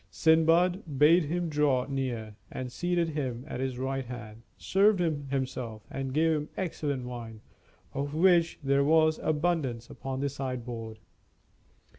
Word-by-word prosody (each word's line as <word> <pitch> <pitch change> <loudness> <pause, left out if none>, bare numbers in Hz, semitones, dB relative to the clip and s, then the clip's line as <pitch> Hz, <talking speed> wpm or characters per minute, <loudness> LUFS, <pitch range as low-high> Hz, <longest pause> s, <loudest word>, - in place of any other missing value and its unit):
Sindbad 165 0 +3
bade 160 +4 +6
him 175 +3 -1
draw 145 -5 +2
near, 125 -6 -3 0.2
and 130 -1 -5
seating 175 +3 0
him 130 -4 -3
at 125 - -5
his 130 -1 -2
right 135 +1 -2
hand, 115 -3 -8 0.2
served 200 +1 +3
him 155 -5 -1
himself, 130 -5 -3
and 135 -1 -3
gave 160 +3 +3
him 150 0 -3
excellent 145 -8 -2
wine, 115 -3 -7 0.5
of 145 +2 -3
which 170 -1 +4
there 140 0 +3
was 155 +1 +4
abundance 150 -7 -1
upon 130 0 -5
the 140 +1 0
sideboard. 120 -5 -5
140 Hz, 140 wpm, -29 LUFS, 125-160 Hz, 0.5 s, bade